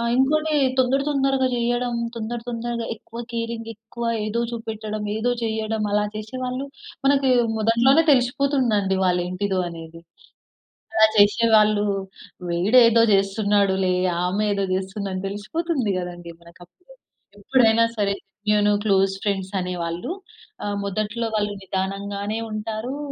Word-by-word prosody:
ఆ! - - -1
ఇంకోటి 310 +4 +2 0.3
తొందర 260 +2 +3
తొందరగా 270 -2 +1
చేయడం. 240 0 0 0.2
తొందర 230 +1 -3
తొందరగా 235 0 -3
ఎక్కువ 230 +1 -10
కేరింగ్. 230 -1 -4
ఎక్కువ 225 +2 -8 0.2
ఏదో 220 +2 -1
చూపెట్టడం. 220 -2 -5
ఏదో 230 +3 0
చేయడం. 220 -1 -2
అలా 210 0 +2
చేషేవాళ్ళు 255 +5 -4 0.4
మనకి 275 -1 +3 0.3
మొదట్లోనే 235 +8 +4
తెలిసిపోతుందండి 245 -6 +1
వాళ్ళ 180 -1 +2
ఏంటిదో 190 +1 -2
అనేది. 165 0 -10 0.9
అలా 220 0 +7
చేసేవాళ్ళు 210 0 +4 0.6
వీడు 185 +9 +4
ఏదో 230 0 +5
చేస్తున్నాడులే. 195 -1 +2 0.3
ఆమె 200 +4 0
ఏదో 200 0 0
చేస్తుందని 190 0 -3
తెలిసిపోతుంది 235 - -2
కదండీ 175 -1 -7
మనకీ 170 +1 -18
అప్పుడే. 360 - -22 0.4
ఎప్పుడైనా 230 0 +4
సరే 200 -1 +1 0.4
నేను 210 0 +3
క్లోస్ 195 -1 +3
ఫ్రెండ్స్ 195 -1 -2
అనే 180 0 -3
వాళ్ళు. 170 - -4 0.5
ఆహ్, 205 0 -2
మొదట్లో 215 +4 -2
వాళ్ళు 205 0 -1
నిదానంగానే 200 +3 -3
ఉంటారు. 220 +5 -4
215 Hz, 120 wpm, -23 LUFS, 195-240 Hz, 0.9 s, అలా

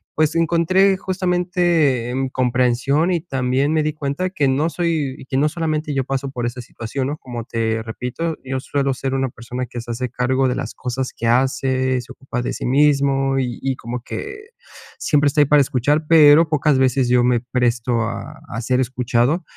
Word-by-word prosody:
pues, 155 +1 +1
encontré 175 +4 +3
justamente 175 -8 +1
em, 130 +1 -2
comprensión. 130 +5 +1
Y 170 -2 0
también 135 -2 0
me 155 -1 +2
di 155 0 -1
cuenta, 150 +5 -2
que 150 -7 0
no 145 +5 +1
soy 160 -5 -1
y - - -12
que 130 - -2
no 145 +3 +3
solamente 155 -2 -2
yo 135 -1 0
paso 135 +1 -3
por 125 -3 -4
esa 120 +1 -4
situación, 120 +3 -5
¿no? 145 +2 -3
Como 120 -4 -7
te 115 -1 -1
repito, 125 +8 -4
yo 130 0 -3
suelo 140 0 -1
ser 135 +1 -3
una 135 -1 0
persona 120 +2 -6
que 120 0 -7
se 120 +1 -6
hace 125 +2 -3
cargo 130 +2 +1
de 125 - -1
las 130 -4 -4
cosas 125 +1 -4
que 115 - -2
hace, 130 +1 +1
se - - -13
ocupa 125 -2 -5
de 120 - -3
sí - - -5
mismo, 135 0 +2
y 125 -2 -3
y 135 -1 -1
como 120 +1 -5
que, 410 - -6 0.6
siempre 145 -1 +2
está 145 +2 +1
ahí - - +5
para 145 +1 +5
escuchar, 140 +4 +1
pero 155 0 +7
pocas 150 -2 +2
veces 130 -1 +2
yo 125 0 +4
me 125 -1 +3
presto 120 -1 0
a 115 0 -5
a 115 - -4
ser 125 +2 0
escuchado. 125 +5 0
135 Hz, 195 wpm, -20 LUFS, 125-150 Hz, 0.6 s, pero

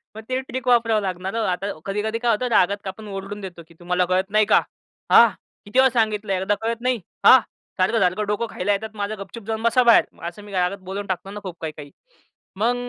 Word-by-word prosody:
मग 220 - -7
ते 255 0 0
ट्रिक 260 0 -6
वापरावं 230 -3 +3
लागणार 190 +2 -4
हो. 230 - 0
आता 185 +3 -2
कधी-कधी 210 +3 -2
काय 240 -1 +2
होतं, 245 +4 0
रागात 200 +2 +2
आपण 210 +3 -7
ओरडून 195 +1 -6
देतो 175 -3 -8
की 170 - -19
"तुम्हाला 180 +1 0
कळत 185 +2 0
नाही 215 0 +4
का? - - +6 0.5
हा? - - +9 0.4
किती 210 +6 0
वेळा 265 0 +6
सांगितलं, 210 -2 0
एकदा 190 +2 0
कळत 230 +1 -2
नाही? 250 -2 0 0.3
हा? 260 - +9 0.4
सारखं-सारखं 190 0 +1
डोकं 210 +3 -1
खायला 195 +3 -2
येतात 215 +2 -3
माझं, 205 +1 -3
गपचूप 200 +3 -9
जाऊन 220 0 -3
बसा 250 +2 +4
बाहेर." 235 -1 +6 0.2
असं 190 +4 -8
मी 205 - -12
रागात 180 +1 0
बोलून 200 +1 -4
टाकतो 190 +1 -4
ना 210 - -6
खूप 180 -3 -6
काही-काही. 150 -3 -7 0.7
मग 235 +4 +2
205 Hz, 210 wpm, -22 LUFS, 190-225 Hz, 0.7 s, हा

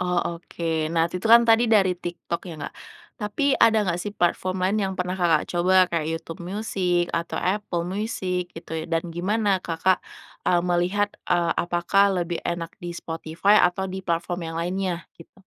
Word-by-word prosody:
Oh, 180 -1 +1 0.2
oke. 160 -3 -2
Nah, 165 -1 +3
itu 180 +2 -5
itu 220 - -2
kan 235 +1 +9
tadi 225 +1 +5
dari 195 -4 +5
TikTok 175 -1 -5
ya 170 - -6
nggak? - - -6 0.5
Tapi 265 +7 +1
ada 225 -3 +5
nggak 175 0 -1
sih 205 - -4
platform 185 -1 0
lain 200 +3 +1
yang 190 -1 -1
pernah 180 0 -1
Kakak 170 -4 +2
coba, 185 +1 +4
kayak 165 -3 -2
YouTube 165 +1 -6
Music 180 -2 -1
atau 170 0 -2
Apple 185 -3 -1
Music 185 -2 -2
gitu 165 -2 -11
ya, - - -6
dan 165 +1 -1
gimana 195 +1 +1
Kakak, 175 +2 +1 0.5
eee, 175 - +4
melihat, 180 +4 +1 0.2
eee, 170 -1 +3
apakah 175 +3 +2 0.2
lebih 170 0 -4
enak 170 -1 -3
di 175 - -4
Spotify 165 +6 +2
atau 180 +2 +2
di 190 0 -5
platform 175 0 -2
yang 165 - -6
lainnya? 180 0 -2
Gitu. 170 +3 -17
180 Hz, 175 wpm, -24 LUFS, 170-195 Hz, 0.5 s, kan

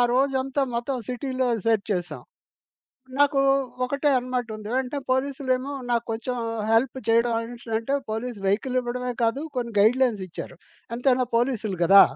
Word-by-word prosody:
రోజంతా 270 +1 +1
మొత్తం 250 +3 -1
సిటీలో 260 +1 -1 0.2
సెర్చ్ 225 -2 +2
చేసాం. 175 -2 -4 1.0
నాకు 285 -1 +4 0.4
ఒకటే 280 +3 +1
అనమాటుంది. 245 -4 -4
అంటే 265 +2 -4
పోలీసులేమో 260 0 0 0.2
నాకు 235 -1 +1
కొంచెం 250 +3 -3 0.3
హెల్ప్ 235 +3 +3
చేయడం 230 +1 +4
అనేసి 235 +1 -7
అంటే 230 +5 -2 0.2
పోలీస్ 225 +1 -3
వెయికల్ 240 +6 +1
ఇవ్వడమే 250 0 -3
కాదు 230 +4 +2 0.2
కొన్ని 235 -2 -2
గైడ్లైన్స్‌‌లిచ్చారు. 215 -7 +1 0.4
ఎంతైనా 250 0 +2
పోలీసులు 230 -5 0
కదా! 195 +3 +9
245 Hz, 125 wpm, -25 LUFS, 225-260 Hz, 1.0 s, కదా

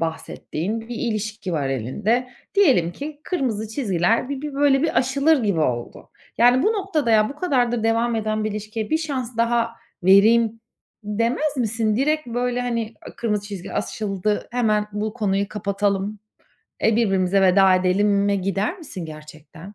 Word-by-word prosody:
bahsettiğin 165 +4 -4
bir 230 +2 -8
ilişki 215 -4 -3
var 145 -4 -1
elinde. 205 - -1 0.3
Diyelim 260 - +4
ki 290 - -7
kırmızı 235 - -2
çizgiler 220 - 0
bir 280 -1 -4
bir, 295 -1 -6
böyle, 280 -1 +3
bir 325 - +2
aşılır 275 +3 +2
gibi 200 -6 +1
oldu. 120 -5 -3 0.3
Yani, 245 +2 +5
bu - - +3
noktada, 380 - -1
"Ya, 215 -1 +4
bu 285 - -8
kadardır 245 -8 +1
devam 230 +1 +1
eden 215 0 -1
bir 215 - -1
ilişkiye 215 +1 -5
bir 315 - +2
şans 260 -7 -4
daha 230 0 +1 0.3
vereyim." 220 +4 +5 0.4
demez 235 +8 -1
misin? 225 -3 0
Direkt, 305 +3 +1
böyle, 245 +1 -1
hani, 230 -2 -2
"A! - - -10
Kırmızı 210 -3 -2
çizgi 195 -3 -7
aşıldı. 205 -1 -2
Hemen 215 -4 +1
bu 210 +1 -3
konuyu 200 -3 0
kapatalım, 200 0 -1 0.6
eee, 225 -1 +3
birbirimize 195 -4 +2
veda 190 0 +5
edelim."e 200 +2 +2
gider 195 - -1
misin 270 - -7
gerçekten? 155 +4 -12
220 Hz, 150 wpm, -22 LUFS, 200-245 Hz, 0.6 s, Yani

